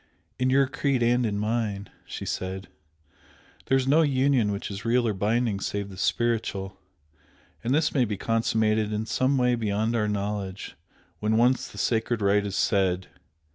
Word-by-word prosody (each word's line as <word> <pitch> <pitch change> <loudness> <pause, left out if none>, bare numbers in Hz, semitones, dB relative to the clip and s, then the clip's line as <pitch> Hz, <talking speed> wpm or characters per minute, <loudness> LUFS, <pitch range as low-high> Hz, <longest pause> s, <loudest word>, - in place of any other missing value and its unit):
"In 130 0 +2
your 135 +1 +4
Creed 135 -2 0
and 120 0 +2
in 100 -1 -2
mine," 105 -2 -2 0.2
she - - -6
said 95 +1 -4 1.0
"there 135 - +4
is 130 0 -1
no 150 +4 +5
union 135 -6 +2
which 100 +1 -4
is 100 +2 -6
real 120 +1 +2
or 110 - +1
binding 105 +1 0
save 100 0 -3
the 95 - -10
Spiritual, 100 -2 -1 0.9
and 120 - -1
this 150 +2 +2
may 130 -4 +3
be 105 -2 -3
consummated 110 -1 +1
in 105 +1 -2
some 130 +4 +1
way 125 -1 +3
beyond 110 0 0
our 105 -2 +1
knowledge 100 -2 -3 0.4
when 110 +1 +1
once 125 +2 +3
the - - -13
sacred 115 +3 0
rite 100 0 +2
is 100 - -4
said. 95 -3 +1
110 Hz, 170 wpm, -26 LUFS, 100-125 Hz, 1.0 s, no